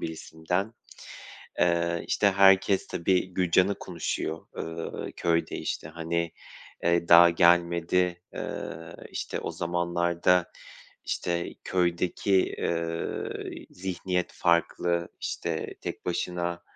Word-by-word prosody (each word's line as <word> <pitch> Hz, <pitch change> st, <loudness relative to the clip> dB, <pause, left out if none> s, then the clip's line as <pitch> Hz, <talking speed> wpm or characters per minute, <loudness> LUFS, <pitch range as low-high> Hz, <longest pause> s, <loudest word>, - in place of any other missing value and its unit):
birisinden. 80 Hz, +6 st, -3 dB, 0.8 s
Eee, 85 Hz, -1 st, +1 dB
işte, 100 Hz, -, +3 dB
herkes, 95 Hz, 0 st, +5 dB
tabii, 90 Hz, +2 st, +1 dB
Gülcan'ı 95 Hz, +2 st, +3 dB
konuşuyor, 85 Hz, -2 st, -4 dB
ııı, 80 Hz, 0 st, -5 dB
köyde, 85 Hz, -1 st, 0 dB
işte. -, -, -4 dB
Hani, 85 Hz, +1 st, -2 dB, 0.5 s
eee, 85 Hz, 0 st, +2 dB
daha 85 Hz, 0 st, +9 dB
gelmedi. 85 Hz, +1 st, +3 dB
Iıı, -, -, -6 dB
işte, -, -, -4 dB
o -, -, -3 dB
zamanlarda, 85 Hz, +1 st, +1 dB, 0.5 s
işte, 85 Hz, -1 st, -2 dB
köydeki, 90 Hz, +2 st, +1 dB
ııı, 85 Hz, 0 st, -2 dB, 0.4 s
zihniyet 90 Hz, -1 st, -3 dB
farklı. 85 Hz, 0 st, +1 dB
İşte, -, -, -3 dB
tek -, -, -6 dB
başına, 85 Hz, 0 st, -2 dB
85 Hz, 95 wpm, -27 LUFS, 85-90 Hz, 0.8 s, daha